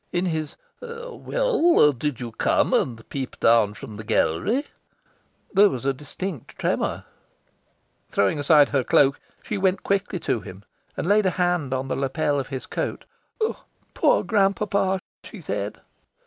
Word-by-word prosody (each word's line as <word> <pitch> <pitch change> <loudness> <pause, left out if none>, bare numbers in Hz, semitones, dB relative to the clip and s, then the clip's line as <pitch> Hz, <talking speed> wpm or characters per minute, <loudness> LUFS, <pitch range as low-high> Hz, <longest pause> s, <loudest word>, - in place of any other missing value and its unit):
In 175 +1 0
his 160 -4 -2 0.3
"Well, 470 - +2
did 135 0 -3
you 120 -2 -5
come - - +1
and 115 -3 0
peep 135 -2 -5
down 110 -3 +4
from 110 -1 -9
the 110 - -7
gallery?" 210 - +1 0.9
there 205 +1 +6
was 130 -4 -5
a 135 - +2
distinct 150 - -7
tremour. - - -1 1.0
Throwing 100 +9 +1
aside 145 0 +5
her 135 -3 +1
cloak, 140 +2 +3 0.2
she 210 - -3
went 190 0 +1
quickly 195 -1 0
to - - 0
him, 95 +1 -11 0.3
and - - -2
laid 205 +1 +3
a 185 - -2
hand 175 -6 +1
on 130 0 -2
the - - -1
lapel 145 +2 0
of 135 - -4
his 135 -2 -5
coat. - - -4 0.9
"Poor - - +3
grand 200 -3 +2
papa!" 195 -2 0 0.2
she - - -10
said. - - -4
155 Hz, 150 wpm, -24 LUFS, 130-195 Hz, 1.0 s, there